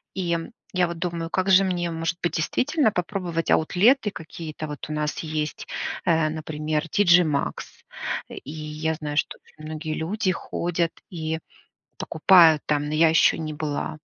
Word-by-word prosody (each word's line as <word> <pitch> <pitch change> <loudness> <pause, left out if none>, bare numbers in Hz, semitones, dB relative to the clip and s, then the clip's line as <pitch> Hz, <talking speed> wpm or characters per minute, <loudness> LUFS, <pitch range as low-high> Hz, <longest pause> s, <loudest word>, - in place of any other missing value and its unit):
И, 180 -3 -1
м, 165 -1 -3 0.2
я 180 -1 +3
вот 170 -1 -6
думаю, 170 -1 -3
как 185 +1 0
же 190 +1 +7
мне, 175 -2 -1
может 165 +2 -2
быть, 175 - 0
действительно 265 - +1
попробовать 180 -3 -2
аутлеты 210 - +4
какие-то. 160 -2 -7
Вот 150 0 -7
у - - -3
нас 150 0 -2
есть, 155 -1 -3 0.4
э, 165 -3 +3
например, 155 0 -3
TG 180 -1 +5
Max, 150 -4 -3 0.5
э, - - -9
и 140 - -8
я 155 +1 -3
знаю, 150 -2 -5
что - - 0
очень 155 - -15
многие 155 0 -4
люди 185 +4 -1
ходят 170 -1 -2 0.2
и 160 -2 -3 0.6
покупают 165 -2 +5
там, 150 -1 +1
но 150 - -2
я 160 +1 +5
еще 160 - +4
не 155 -2 -4
была. 150 0 -3
165 Hz, 165 wpm, -24 LUFS, 155-180 Hz, 0.6 s, же